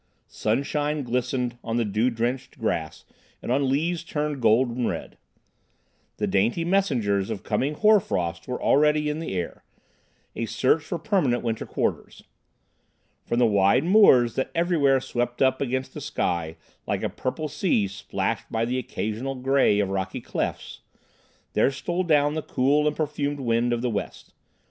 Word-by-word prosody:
Sunshine 145 +6 -1
glistened 125 0 -2
on 115 0 -2
the 120 - +1
dew 105 +4 +1
drenched 125 +3 -3
grass 80 -8 -3 0.3
and - - -5
on 135 +1 +2
leaves 165 +5 0
turned 150 -4 -3
golden 120 +1 +2
red. - - -5 1.0
The - - 0
dainty 115 - +1
messengers 120 - +1
of 110 -3 -5
coming 130 +8 -1
hoar 215 +4 +5
frost 85 - -3
were 125 - -3
already 150 +1 +3
in 150 - -4
the 160 -12 -4
air, 90 -2 -4 0.7
a 115 - -3
search 135 +7 +2
for 170 - -4
permanent 165 - +1
winter 115 -2 -2
quarters. - - -3 1.0
From 120 - 0
the 125 - +5
wide 100 +4 +3
moors 165 - +6
that 130 - 0
everywhere 155 -6 +3
swept 120 -1 -3
up 130 -1 +2
against 130 0 -2
the 150 - -7
sky, 85 - -2 0.3
like - - -1
a - - +2
purple 155 +4 -4
sea 145 - +1
splashed 100 +1 -3
by 115 0 0
the 125 +2 -1
occasional 120 +3 -4
grey 130 -5 +2
of 100 -2 +1
rocky 95 -1 -3
clefts, - - -4 0.7
there - - +3
stole 170 +7 -2
down 150 -4 +3
the 155 - -2
cool 145 +2 +1
and 150 - 0
perfumed 145 -2 -2
wind 120 0 +1
of 120 0 -1
the 125 - +1
west. 105 - -5
130 Hz, 160 wpm, -25 LUFS, 115-150 Hz, 1.0 s, moors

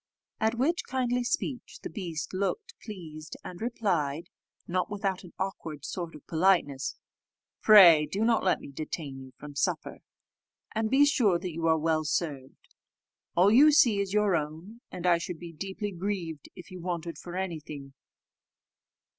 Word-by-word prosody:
At 220 +1 +1
which 300 +8 +1
kindly 250 -1 0
speech 245 +1 -3
the - - -4
beast 170 -8 -5
looked 410 - -2
pleased, 160 -7 -8
and 180 +1 -9
replied, 175 - -1 0.4
not 185 +1 -1
without 195 -2 -2
an 175 - -12
awkward 160 -6 -5
sort 170 -3 -5
of 150 - -13
politeness, 160 -5 +1 0.7
"Pray 175 -8 +8
do 210 +3 -1
not 230 -1 +3
let 185 - +2
me - - -10
detain 145 -1 -5
you 130 0 -11
from 150 0 -10
supper, 140 - -2 0.7
and 220 0 0
be 275 +3 +6
sure 225 - +3
that 175 -1 -5
you 165 +1 -1
are 160 0 +4
well 155 0 +1
served. 145 -4 -4 0.6
All 185 +4 +5
you 285 +7 +7
see 255 -9 +5
is 200 -1 -1
your 210 -2 +3
own, 165 +9 -5
and 180 -1 -6
I 175 -1 +4
should 170 0 -5
be 170 0 -9
deeply 195 +5 -4
grieved 175 -5 -4
if 180 - -12
you 185 -1 -8
wanted 170 -3 -4
for 175 0 -8
any 185 -4 -2
thing." 140 -2 -10
180 Hz, 165 wpm, -29 LUFS, 160-210 Hz, 0.7 s, Pray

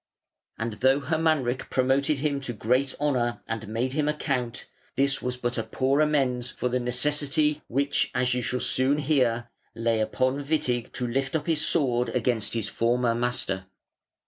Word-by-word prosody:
And 115 0 -3
though 135 +2 +5
Hermanric 150 -4 0
promoted 135 +3 +2
him 145 -2 0
to 125 -2 -4
great 125 +5 +1
honour 125 -5 0
and 115 -1 -4
made 120 +4 -1
him 150 0 +1
a 150 - +1
count, 125 -5 -2 0.3
this 140 0 +1
was 125 0 -3
but 120 -1 -2
a - - -1
poor 135 +5 +1
amends 130 -5 +1
for 125 - -2
the 125 +1 0
necessity 145 +4 0
which, 140 +3 +1
as 125 0 +2
you 125 - 0
shall 125 +1 -2
soon 130 +3 +2
hear, 125 -5 +1 0.2
lay 115 -1 +1
upon 130 +5 0
Witig, 130 -5 -1
to 125 - -2
lift 135 +4 -1
up 150 -2 -1
his 155 -2 +1
sword 125 -6 +1
against 115 -3 0
his 115 -3 -1
former 120 0 +1
master. 115 -6 -2
130 Hz, 170 wpm, -26 LUFS, 120-140 Hz, 0.3 s, though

